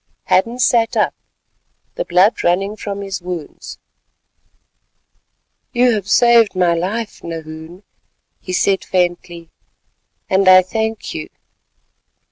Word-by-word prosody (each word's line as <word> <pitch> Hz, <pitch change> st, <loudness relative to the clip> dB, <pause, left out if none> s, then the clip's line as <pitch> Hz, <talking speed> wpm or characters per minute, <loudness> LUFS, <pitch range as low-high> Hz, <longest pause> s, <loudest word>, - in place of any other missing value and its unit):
Hadden 230 Hz, +6 st, +1 dB
sat 235 Hz, -2 st, +2 dB
up, -, -, +1 dB, 0.8 s
the -, -, -3 dB
blood 185 Hz, +5 st, +2 dB
running 195 Hz, +4 st, 0 dB
from 200 Hz, -2 st, -6 dB
his 195 Hz, -2 st, -5 dB
wounds. 175 Hz, -4 st, -8 dB, 2.0 s
"You 245 Hz, 0 st, +3 dB
have 205 Hz, -4 st, -3 dB
saved 235 Hz, -4 st, +4 dB
my 180 Hz, -2 st, +2 dB
life, 205 Hz, +7 st, -4 dB
Nahoon," 160 Hz, +2 st, -9 dB, 0.6 s
he 185 Hz, -, -8 dB
said 190 Hz, +1 st, +1 dB
faintly, 175 Hz, -2 st, -2 dB, 0.8 s
"and 190 Hz, 0 st, +1 dB
I 185 Hz, 0 st, +8 dB
thank 220 Hz, +3 st, -3 dB
you." -, -, -6 dB
190 Hz, 105 wpm, -17 LUFS, 175-220 Hz, 2.0 s, I